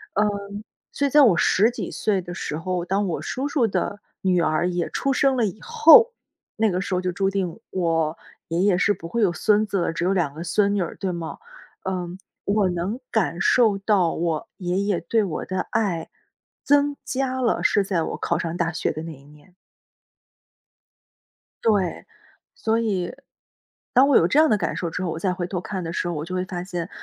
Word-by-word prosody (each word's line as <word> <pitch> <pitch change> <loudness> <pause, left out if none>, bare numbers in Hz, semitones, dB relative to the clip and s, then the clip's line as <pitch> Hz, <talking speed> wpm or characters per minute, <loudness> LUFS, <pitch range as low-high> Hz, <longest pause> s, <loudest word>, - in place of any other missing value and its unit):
嗯， 205 0 -1 0.3
所 285 - 0
以 - - -2
在 295 +2 +6
我 220 -11 +5
10 215 +7 +3
几 - - -5
岁 200 -3 0
的 175 0 -8
时 150 - -4
候， 180 +1 -2
当 195 +3 0
我 175 - -3
叔 265 +3 -3
叔 285 -4 +1
的 205 -1 -2 0.2
女 180 -2 +2
儿 155 +2 +1
也 175 -1 -2
出 275 - -1
生 270 0 +2
了 235 - +2
以 205 +1 -4
后， 460 +1 +7 0.5
那 220 0 +3
个 185 -1 -1
时 190 - -4
候 180 - +2
就 180 -1 -2
注 195 +2 +1
定， 190 -4 -2
我 165 -3 0 0.3
爷 165 +1 -1
爷 195 -3 +3
是 205 +2 +3
不 165 -3 -9
会 235 +7 -2
有 200 -5 +3
孙 210 +4 +2
子， 195 -5 -1
只 165 - -2
有 180 - +2
两 170 -7 0
个 160 +3 -7
孙 200 +4 +1
女 200 - +1
儿， 170 - -4
对 190 -2 -2
吗？ 170 -2 -5 0.5
嗯， 180 -1 -4 0.2
我 200 -1 +2
能 180 +7 -3
感 180 -6 0
受 215 +1 +4
到 195 -4 +2
我 165 -2 -2
爷 180 -1 -2
爷 200 -3 0
对 215 +6 +1
我 175 -6 -4
的 185 0 -2
爱 175 -7 -1 0.6
增 285 0 +3
加 260 -1 -2
了， 235 -3 +1
是 205 - +3
在 180 -4 0
我 - - -4
考 - - -1
上 165 +1 -3
大 170 -1 -1
学 - - -1
的 155 +1 -6
那 165 0 -7
一 135 -2 -16
年。 150 +5 -19 2.1
对， 200 -6 +1 0.5
所 225 +1 0
以， 200 -4 -1 0.8
当 265 +2 +6
我 280 - +3
有 165 - +4
这 245 +12 +3
样 315 0 +5
的 215 - +3
感 - - -2
受 170 - -2
之 180 +3 -4
后， 180 - -1
我 160 - -4
再 185 +1 0
回 180 -1 -4
头 180 0 -3
看 185 +1 -5
的 165 - -4
时 175 - -2
候， 175 - -2
我 150 -2 -4
就 185 +2 -5
会 185 0 -1
发 180 -2 -5
现， 175 -1 -5
185 Hz, 225 characters per minute, -23 LUFS, 170-215 Hz, 2.1 s, 后